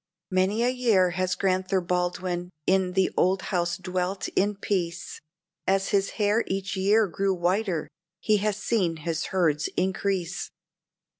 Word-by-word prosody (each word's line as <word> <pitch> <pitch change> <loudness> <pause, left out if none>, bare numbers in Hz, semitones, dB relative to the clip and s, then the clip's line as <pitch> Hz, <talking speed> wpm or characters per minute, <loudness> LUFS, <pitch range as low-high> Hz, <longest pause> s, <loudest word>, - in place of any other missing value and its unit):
Many 190 +5 +2
a 245 - +3
year 225 -8 +3
has 185 0 0
Grand'ther 185 0 +1
Baldwin 180 0 -2 0.2
in 190 -1 +2
the 190 0 +2
old 190 +1 +2
house 175 -1 0
dwelt 185 +1 -2
in 205 +2 +1
peace, 175 -4 -3 0.5
As 195 0 +2
his 195 -1 +2
hair 210 +1 +2
each 195 +1 -2
year 205 +3 +4
grew 195 +2 0
whiter, 180 0 0 0.3
he 215 -1 +2
has 210 0 0
seen 195 -6 0
his 165 -2 -1
herds 160 -5 +1
increase. 190 -1 -1
190 Hz, 140 wpm, -26 LUFS, 180-200 Hz, 0.5 s, year